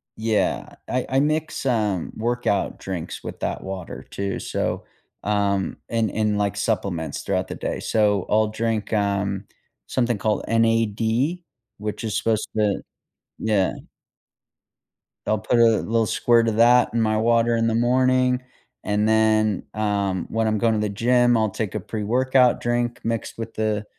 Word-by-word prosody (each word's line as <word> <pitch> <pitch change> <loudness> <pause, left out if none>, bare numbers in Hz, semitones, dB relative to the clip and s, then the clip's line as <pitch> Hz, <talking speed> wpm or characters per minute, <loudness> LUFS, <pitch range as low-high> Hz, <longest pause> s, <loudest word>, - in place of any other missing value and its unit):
Yeah, 110 -1 -1
I 125 0 -1
I 130 - +2
mix, 155 0 -1
um, 105 -8 0
workout 115 -3 -1
drinks 90 -4 -6
with - - -7
that - - -3
water 95 -2 -6
too, 100 0 -3
so, - - -2 0.4
um 100 -2 0
and 115 -3 0
and, 105 -1 0
like, 100 -1 0
supplements 100 -6 -2
throughout - - -1
the - - -6
day. - - -3
So 105 -3 +1
I'll 110 0 +3
drink, 110 0 -2
um, 100 -1 0 0.4
something 120 -3 0
called 105 -1 0
N-A-D 115 - +1 0.4
which 105 +1 -4
is 110 -3 -1
supposed 110 -2 0
to 105 -2 +1 0.6
Yeah. 105 -4 +1 1.6
I'll 110 - +2
put 115 +3 +1
a - - +7 0.2
little 115 0 +1
squirt 115 +1 +3
of 110 -1 0
that 120 +2 +5
in 115 - +1
my 110 -1 +2
water 115 +1 +3
in 115 0 +1
the 115 - +1
morning, 125 +1 +2 0.4
and 105 +1 +1
then, 110 -2 +3
um, 100 -4 -1
when 115 0 0
I'm 110 0 +1
going 115 +1 +2
to 110 - 0
the 105 0 0
gym, 120 +3 +3
I'll 110 -1 +2
take 100 0 -4
a - - 0
pre-workout 125 +5 +2
drink 120 0 -1
mixed 115 -1 -3
with 115 0 -6
the 110 -1 -1
110 Hz, 155 wpm, -23 LUFS, 105-120 Hz, 1.6 s, a